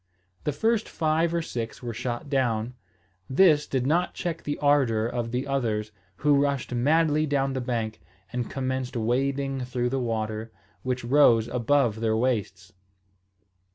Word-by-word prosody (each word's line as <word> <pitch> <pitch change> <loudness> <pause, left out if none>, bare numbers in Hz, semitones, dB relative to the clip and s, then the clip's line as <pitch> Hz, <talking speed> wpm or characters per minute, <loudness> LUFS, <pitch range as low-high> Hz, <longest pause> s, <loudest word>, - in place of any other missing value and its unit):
The 150 - +1
first 220 +9 0
five 160 +1 +1
or 170 -1 0
six 120 -3 -5
were 120 -1 -4
shot 120 +4 -4
down. 125 -4 0 0.6
This 150 +1 +4
did 130 -2 -1
not 170 +6 +1
check 170 -2 -3
the 145 - -3
ardour 135 -7 +3
of 120 0 -2
the 125 +3 -2
others, 110 -6 -1 0.2
who 145 +4 +3
rushed 140 -3 -1
madly 155 +4 +2
down 135 -1 0
the 130 - -2
bank, 115 -5 -3 0.3
and 125 -1 -2
commenced 130 -2 -3
wading 135 +4 0
through 125 -1 -1
the 135 +1 -1
water, 110 -2 -3 0.3
which 130 -1 -2
rose 120 -4 +5
above 120 -2 +1
their 110 -1 +1
waists. 105 -5 -2
130 Hz, 150 wpm, -26 LUFS, 115-145 Hz, 0.6 s, rose